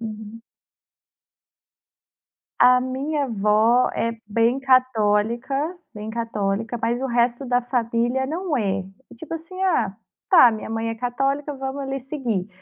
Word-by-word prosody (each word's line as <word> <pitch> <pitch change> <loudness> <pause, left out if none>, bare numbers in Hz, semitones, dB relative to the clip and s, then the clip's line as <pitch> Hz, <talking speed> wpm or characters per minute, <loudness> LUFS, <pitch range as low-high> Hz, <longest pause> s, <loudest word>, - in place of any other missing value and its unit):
Uhum. 220 0 -8 2.2
A 250 +1 +7
minha 275 +3 -2
avó 220 +2 +3
é 230 0 -1
bem 230 +4 +2
católica, 240 -1 +2 0.4
bem 210 +1 -6
católica, 225 -1 -2
mas 235 +2 0
o 265 - -1
resto 240 +2 0
da 245 0 +2
família 240 +1 0
não 325 +1 -2
é. 195 -4 0 0.3
E - - -12
tipo 305 +7 -10
assim: 330 +3 -8
"Ah, 240 - +1 0.3
tá 330 - +8
minha 220 -1 -6
mãe 225 0 -2
é 225 - -2
católica, 275 +5 -1
vamos 270 +1 -4
ali 270 0 -3
seguir". 245 -8 -3
240 Hz, 135 wpm, -23 LUFS, 225-270 Hz, 2.2 s, tá